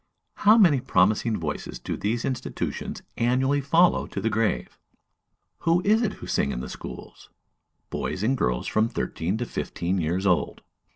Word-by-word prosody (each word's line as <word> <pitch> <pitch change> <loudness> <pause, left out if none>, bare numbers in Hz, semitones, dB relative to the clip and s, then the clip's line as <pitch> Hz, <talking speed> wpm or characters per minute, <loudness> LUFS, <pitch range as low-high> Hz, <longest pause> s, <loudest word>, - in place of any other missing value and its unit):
How 215 +2 +6
many 170 - +6
promising 110 0 +2
voices 75 -3 -4
do - - -4
these 115 +3 -1
institutions 130 -3 -4
annually 130 +4 +2
follow 165 +6 +3
to - - -5
the 115 - -1
grave? 110 0 -1 0.8
Who 170 +1 +2
is 215 +3 +4
it 225 - 0
who - - -10
sing 70 - 0
in - - -3
the - - -6
schools? - - -9 0.6
Boys 95 - -3
and 130 +5 +2
girls 60 - 0
from 110 +1 +1
thirteen 95 -4 -2
to 120 - -2
fifteen 90 -4 -2
years 90 +4 -1
old. 90 -3 +1
115 Hz, 160 wpm, -25 LUFS, 95-140 Hz, 0.8 s, How